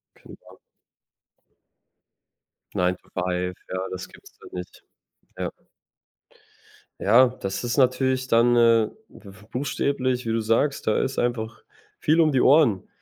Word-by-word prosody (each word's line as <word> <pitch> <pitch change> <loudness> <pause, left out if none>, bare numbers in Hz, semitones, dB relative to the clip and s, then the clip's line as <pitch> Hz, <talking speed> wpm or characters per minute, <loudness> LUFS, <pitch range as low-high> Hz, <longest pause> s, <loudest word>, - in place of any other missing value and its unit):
Genau. - - -16 2.2
9 90 0 +1
to - - -26
5, 90 0 -2
ja, 95 - -3
das 95 0 -6
gibt's - - -18
da - - -14
nicht, 90 0 -9 0.6
ja. - - -3 1.5
Ja, 120 +6 +5
das 100 -4 -5
ist 120 +3 -2
natürlich 130 0 +2
dann, 120 +1 +4
äh, 115 -2 +4 0.2
b 100 - -14 0.2
buchstäblich, 130 -2 -1
wie 115 - -1
du 115 - +1
sagst, 115 +6 0
da 110 - +2
ist 135 - -3
einfach 120 -2 -2 0.4
viel 160 +2 +3
um 155 -2 +3
die 130 - +2
Ohren. 130 - +4
120 Hz, 130 wpm, -24 LUFS, 100-130 Hz, 2.2 s, Ja